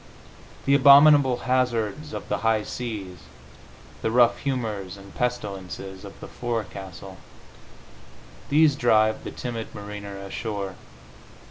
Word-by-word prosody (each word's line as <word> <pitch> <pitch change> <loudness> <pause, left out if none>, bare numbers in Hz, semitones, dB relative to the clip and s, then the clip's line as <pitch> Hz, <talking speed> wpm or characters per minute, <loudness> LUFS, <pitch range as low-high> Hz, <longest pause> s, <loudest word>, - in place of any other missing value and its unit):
The 140 - +3
abominable 140 -2 +7
hazards 125 +2 0
of - - -6
the - - -1
high 110 -1 +1
seas, 105 -9 -6 0.8
the - - 0
rough 120 0 +4
humors 110 -9 -3
and 100 0 -13
pestilences 100 -5 -4
of 100 - -11
the - - -8
forecastle 95 -5 -6 1.3
these 150 0 +4
drive 110 -4 +3
the - - -5
timid 115 -2 -6
mariner 100 -1 -7
ashore.... 100 0 -5
110 Hz, 110 wpm, -25 LUFS, 100-125 Hz, 1.3 s, abominable